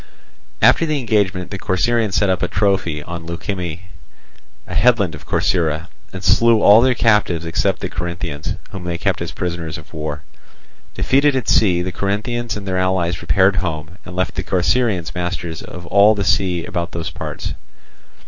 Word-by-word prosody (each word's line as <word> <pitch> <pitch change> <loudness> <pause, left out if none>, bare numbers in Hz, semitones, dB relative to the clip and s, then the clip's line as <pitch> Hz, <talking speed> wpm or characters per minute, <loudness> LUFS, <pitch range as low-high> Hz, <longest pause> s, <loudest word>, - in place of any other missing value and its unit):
After 165 - +5
the 155 -2 0
engagement 100 -7 0
the 95 - -5
Corcyraeans 105 +2 +1
set 95 +3 +3
up 95 -1 0
a 90 - +1
trophy 95 -7 0
on 85 0 -7
Leukimme, 85 -1 -4 0.8
a - - -8
headland 115 -8 +3
of - - -11
Corcyra, 80 -1 0 0.2
and 95 +1 -8
slew 115 +3 +4
all 105 +3 +8
their 130 0 +3
captives 105 -8 +2
except 80 - 0
the - - -2
Corinthians, 85 -4 -4 0.2
whom 95 -3 -7
they 85 -1 -2
kept - - -1
as - - -3
prisoners 85 -3 -4
of 75 - -14
war. 75 -2 -5 0.7
Defeated 140 +1 +3
at 130 -5 -2
sea, 90 -5 +3
the 90 - -3
Corinthians 110 +5 -2
and 100 -1 -8
their 95 -1 0
allies 90 -2 0
repaired 95 +4 +3
home, 85 0 -4
and 90 - -9
left 95 +1 -1
the - - -2
Corcyraeans 95 0 0
masters 85 -2 -4
of 90 -1 -9
all 100 +4 +5
the 100 - -1
sea 90 -3 +1
about 90 -5 -4
those 85 +1 -4
parts. 75 - -5
95 Hz, 170 wpm, -19 LUFS, 85-105 Hz, 0.8 s, all